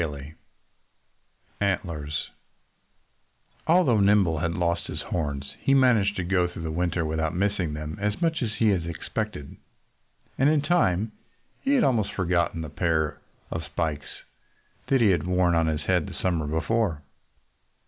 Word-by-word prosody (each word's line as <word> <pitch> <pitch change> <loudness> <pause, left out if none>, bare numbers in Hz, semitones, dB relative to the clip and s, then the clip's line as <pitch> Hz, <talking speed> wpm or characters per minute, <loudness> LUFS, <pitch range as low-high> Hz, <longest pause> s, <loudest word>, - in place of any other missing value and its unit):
XIV 75 -2 -5 1.3
ANTLERS 80 -7 -2 1.4
Although 160 -10 +4
Nimble 100 -5 +4
had 85 +1 -1
lost 85 0 0
his - - -6
horns 70 -5 -3
he 135 - +3
managed 115 -7 +4
to 90 - -2
go 90 0 +2
through 85 -1 -8
the 80 - -3
winter 85 0 0
without 80 0 -1
missing 95 -5 0
them 75 +1 -6
as 105 0 -1
much 165 -2 0
as 110 -3 -2
he 110 0 +3
had 90 -5 0
expected. 85 -2 -5 0.8
And 135 +3 +5
in 150 -2 +2
time 110 - +2 0.5
he 280 +1 +2
had 250 - +4
almost 115 - +1
forgotten 85 -2 0
the 80 - -5
pair 80 -1 0 0.3
of 80 - -3
spikes 75 -1 -4 0.6
that 135 -2 +3
he 105 -4 +5
had 85 -2 0
worn 90 -1 +2
on 80 -1 +2
his 75 -1 -1
head 90 0 +1
the - - -8
summer 85 -5 0
before. 80 +1 0
90 Hz, 150 wpm, -26 LUFS, 80-105 Hz, 1.4 s, And